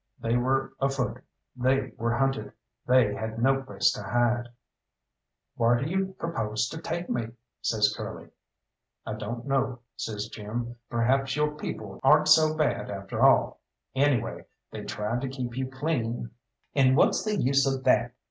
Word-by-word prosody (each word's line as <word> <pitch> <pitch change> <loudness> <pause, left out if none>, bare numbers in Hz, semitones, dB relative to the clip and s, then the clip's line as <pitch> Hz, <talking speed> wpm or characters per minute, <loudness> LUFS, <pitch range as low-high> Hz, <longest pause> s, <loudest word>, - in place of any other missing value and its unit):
They 115 +1 0
were 135 +2 +1
afoot, 135 -2 -1 0.3
they 130 +1 +1
were 115 +1 0
hunted, 135 0 0 0.3
they 125 -5 +4
had 110 0 -4
no 135 +3 +3
place 135 - +1
to - - -5
hide. 120 0 +1 1.1
"Whar 120 +1 +4
do 130 - -2
you 190 +2 -1
propose 110 -9 -1
to 160 - -7
take 170 +1 -3
me?" 120 -2 -1 0.3
says 105 -2 +2
Curly. - - -7 0.8
"I - - -3
don't 115 +3 -5
know," 135 -2 0
says 105 -2 -4
Jim; 120 +3 -5
"perhaps 135 +3 +1
your 150 0 0
people 105 -9 -6
aren't 150 +3 +5
so 155 0 +6
bad 155 -2 0
after 100 -1 -4
all - - +4 0.3
anyway, 135 -4 +1 0.2
they - - -7
tried 110 +4 -2
to 135 - -2
keep 125 -3 -5
you 130 0 -2
clean." 130 -5 -2 0.4
"And 130 -1 +4
what's - - +4
the 215 -1 0
use 140 -4 +3
of 135 -1 -3
that? - - +3
130 Hz, 155 wpm, -27 LUFS, 115-135 Hz, 1.1 s, so